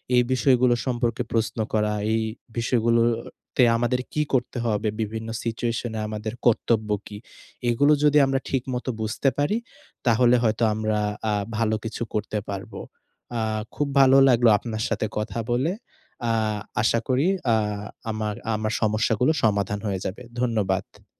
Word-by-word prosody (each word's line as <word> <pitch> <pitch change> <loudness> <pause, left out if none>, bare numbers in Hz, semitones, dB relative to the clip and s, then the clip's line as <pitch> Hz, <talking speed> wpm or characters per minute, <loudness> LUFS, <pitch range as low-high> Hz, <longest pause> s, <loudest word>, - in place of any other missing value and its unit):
এই 125 - +6
বিষয়গুলো 125 -2 +4
সম্পর্কে 120 -2 -1
প্রশ্ন 115 0 0 0.2
করা। 105 -1 +1 0.2
এই 110 - +2 0.4
বিষয়গুলোতে 115 +1 +1
আমাদের 120 +2 +1
কী 150 - +1
করতে 125 0 0
হবে? 110 -1 0
বিভিন্ন 110 +1 -4
সিচুয়েশন 115 +1 -2
এ - - -2
আমাদের 110 +1 -4
কর্তব্য 110 -2 +2 0.2
কী? 105 - -8 0.5
এগুলো 140 +6 +4
যদি 150 0 +5
আমরা 135 0 +1
ঠিকমত 130 -1 -2 0.2
বুঝতে 110 +5 +1
পারি 145 +10 +1 0.5
তাহলে 120 +1 +5
হয়তো 110 0 +1
আমরা 110 0 0 0.3
আ - - +1 0.2
ভালো 110 -1 +1
কিছু 110 +1 -4
করতে 105 0 -2
পারব। 100 -1 -6 0.7
আ - - 0 0.3
খুব 145 - 0
ভালো 135 0 +7
লাগলো 120 -2 +5
আপনার 110 0 -4
সাথে - - -1
কথা 105 +2 -3
বলে। 130 +8 +1 0.6
আ - - +3 0.5
আশা 115 +1 +2
করি 130 +5 +2 0.3
আ - - +5 0.6
আমার 110 -1 -2 0.2
আমার 110 0 -2
সমস্যাগুলো 110 +4 +2
সমাধান 105 -2 +1
হয়ে 95 -2 -1
যাবে। 100 +6 -5 0.2
ধন্যবাদ। 100 -6 -1
115 Hz, 140 wpm, -24 LUFS, 110-125 Hz, 0.7 s, ভালো